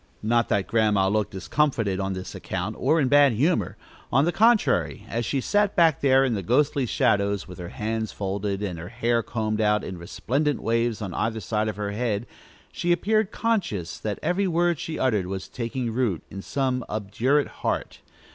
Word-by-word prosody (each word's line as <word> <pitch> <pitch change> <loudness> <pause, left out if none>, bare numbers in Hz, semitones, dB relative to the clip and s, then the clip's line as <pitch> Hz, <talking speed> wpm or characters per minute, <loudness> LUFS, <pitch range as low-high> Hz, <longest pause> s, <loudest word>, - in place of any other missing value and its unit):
Not 115 +1 +2
that 100 -2 +1
Grandma 105 -3 +2
looked 105 +1 0
discomfited 105 -1 0
on 95 0 -1
this 95 0 -6
account, - - -4
or 165 - +3
in 140 - +2
bad 145 -1 +5
humor. 150 +11 +1 0.3
On 135 +4 +4
the 175 - +2
contrary, 175 - +2
as 120 0 -2
she 140 - 0
sat 205 +8 +1
back 165 -5 +4
there 135 -1 +5
in 125 - 0
the 100 - -2
ghostly 135 - +1
shadows, 100 -2 +1
with 90 0 -10
her 85 -1 -6
hands 110 0 -3
folded, 100 0 -3
and 90 -5 -4
her 85 +2 -7
hair 115 +2 +1
combed 110 -1 -2
out 105 0 +2
in 90 -2 -6
resplendent 135 - -1
waves 115 -1 0
on 95 -3 -5
either 110 +3 -1
side 105 +2 -1
of 110 - -2
her 105 -1 -3
head, 110 0 -1 0.5
she 175 - -1
appeared 215 +3 +2
conscious 185 - -2
that 105 -2 -3
every 190 +2 +1
word 175 -2 +1
she 165 -2 -4
uttered 105 -8 +1
was 95 0 -5
taking 115 0 -3
root 115 -9 0
in 95 - -6
some 130 +1 -1
obdurate 115 +7 +1
heart. - - -2
115 Hz, 185 wpm, -25 LUFS, 100-140 Hz, 0.5 s, bad